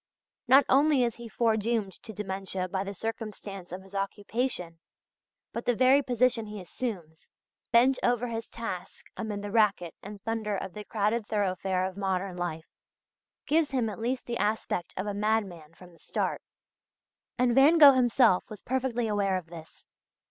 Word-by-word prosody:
Not 270 +3 +7
only 280 0 +4
is 235 -2 -1
he 235 -1 -9
foredoomed 220 -3 0
to 225 - -9
dementia 190 -2 -4
by 190 +1 -2
the 200 0 -6
circumstance 210 -4 -6
of 185 +1 -7
his 195 +1 -18
occupation, 200 -3 -3 0.7
but 235 - -4
the 245 - +2
very 260 +4 +5
position 245 -3 +1
he 210 0 -7
assumes 180 -5 -6 0.4
bent 255 +3 +5
over 245 0 +1
his 230 -1 -5
task 210 -6 -6
amid 210 -3 -4
the 205 - -5
racket 200 -6 +2
and 205 +1 -9
thunder 220 -3 -2
of 190 -1 -6
the 210 0 -8
crowded 215 +1 0
thoroughfare 190 -2 0
of 190 0 -5
modern 190 -1 -1
life 170 -2 -5 0.7
gives 315 0 +2
him 250 -5 0
at 205 - -8
least 245 +3 -2
the 235 -1 -3
aspect 210 -4 -1
of 185 - -2
a 205 - -2
madman 200 -7 -1
from 180 0 -15
the 170 - -19
start. - - -2 1.0
And 250 -1 +3
Van 280 +6 +6
Gogh 290 -3 +10
himself 245 -6 +4
was 210 -3 -9
perfectly 245 -2 -1
aware 200 -3 +1
of 180 - -6
this. 160 -2 -12
210 Hz, 165 wpm, -28 LUFS, 190-240 Hz, 1.0 s, Gogh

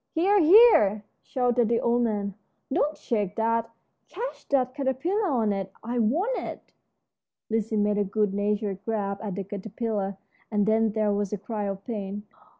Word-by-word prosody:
"Here, 390 +5 +3
here!" 320 - +6 0.2
shouted 245 -3 +1
the 235 - +2
old 240 +1 +2
man, 205 -4 -1 0.4
"don't 305 -1 +1
shake 210 -4 -2
that; 230 0 0 0.4
catch - - -6
that 255 -2 +1
caterpillar 300 - 0
on 225 -7 +1
it. 195 -1 -4
I 240 +2 -2
want 335 - +1
it." - - -8 0.8
Lizzie 220 0 0
made 205 0 +2
a - - +3
good 205 0 0
natured 205 -1 -1
grab 200 -3 -2
at 205 -4 -4
the 200 - -3
caterpillar, 200 0 -4 0.3
and 210 -2 +1
then 220 0 +2
there 215 -1 +1
was 205 -1 -1
a 210 - -2
cry 210 +1 -4
of 195 0 -5
pain. 205 -3 -5
220 Hz, 160 wpm, -26 LUFS, 205-245 Hz, 0.8 s, here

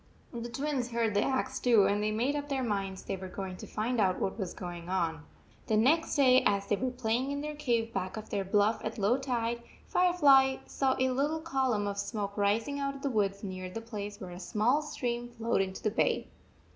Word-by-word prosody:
The 235 0 -5
Twins 270 0 -2
heard 230 -2 0
the 205 - +3
axe 260 +1 -1
too, 230 -5 +5
and 200 +1 +1
they 210 - +1
made 240 +7 0
up 290 0 -4
their 270 -2 0
minds 195 -4 -2
they - - -3
were 190 0 -7
going 185 0 -5
to - - -9
find 230 +3 -1
out 185 -2 +2
what 195 - -2
was 190 -4 -2
going 175 -1 -7
on. 165 -5 -1 0.4
The 215 - +2
next 305 +9 +3
day, 260 -3 +6
as 200 -1 +2
they 205 - +1
were 255 +5 -1
playing 250 +1 -1
in 285 0 -2
their 300 0 -4
cave 235 -6 0
back 185 +2 -3
of 215 - -8
their 200 -2 0
bluff 205 +3 +2
at 220 +2 -4
low 220 +5 +2
tide, 235 -3 -1 0.2
Firefly 285 -7 +5
saw 265 -1 0
a 260 0 +2
little 295 +5 0
column 265 -9 0
of 200 0 -3
smoke 200 -1 -3
rising 220 +7 +1
out 275 0 -2
of 275 - -10
the 280 - 0
woods 200 -3 0
near 185 -2 -5
the 185 - -5
place 210 -3 -6
where 185 -2 -7
a 175 - -8
small 230 +9 +1
stream 240 -5 -3
flowed 230 -3 0
into 190 0 -4
the 215 - +1
bay. 225 - +1
230 Hz, 220 wpm, -30 LUFS, 200-265 Hz, 0.4 s, day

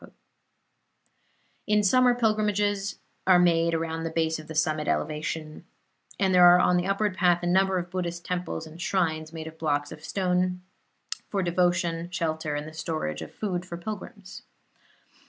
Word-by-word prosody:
In 210 0 +3
summer 250 +4 +4
pilgrimages 210 -3 0 0.3
are 185 -1 +7
made 170 -1 +3
around 165 0 -2
the 165 - -2
base 160 0 0
of 155 - -11
the 160 - -8
summit 155 -1 0
elevation, 155 0 -3 0.6
and 190 -1 +2
there 180 -1 +8
are 175 0 +8
on 180 0 +3
the 175 +1 0
upward 195 0 0
path 175 -1 +3
a - - -1
number 190 +1 +3
of 175 0 -4
Buddhist 175 -2 -4
temples 180 -2 -3
and 160 +2 -11
shrines, 160 -4 -1
made 160 -1 -7
of 160 0 -10
blocks 145 -2 -1
of 155 - -10
stone, 180 -1 0 0.7
for 195 -2 -1
devotion, 175 -1 0
shelter 160 -3 -2
and 145 +1 -4
the 155 - -10
storage 155 - -3
of - - -8
food 180 -4 -3
for 175 -2 -7
pilgrims. 200 0 -8
175 Hz, 160 wpm, -27 LUFS, 160-185 Hz, 0.7 s, there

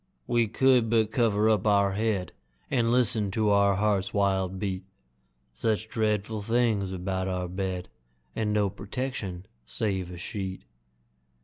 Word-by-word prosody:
We 120 -1 +2
could 125 0 +3
but 110 -1 +2
cover 110 -3 +2
up 110 -2 +2
our 100 -1 +4
head, 100 -4 -1 0.4
And 120 -4 +2
listen 115 -4 +3
to 105 -1 +3
our 100 -1 +4
heart's 100 -1 0
wild 95 -2 +1
beat 95 -1 -3 0.7
Such 110 - -1
dreadful 110 -1 -1
things 110 -3 +1
about 95 0 -2
our 90 -1 -2
bed, 90 0 -3 0.5
And 105 -1 0
no 105 -2 +1
protection 100 -5 -5 0.2
save 95 - -1
a 90 - -8
sheet! 95 +1 -5
100 Hz, 135 wpm, -27 LUFS, 95-110 Hz, 0.7 s, our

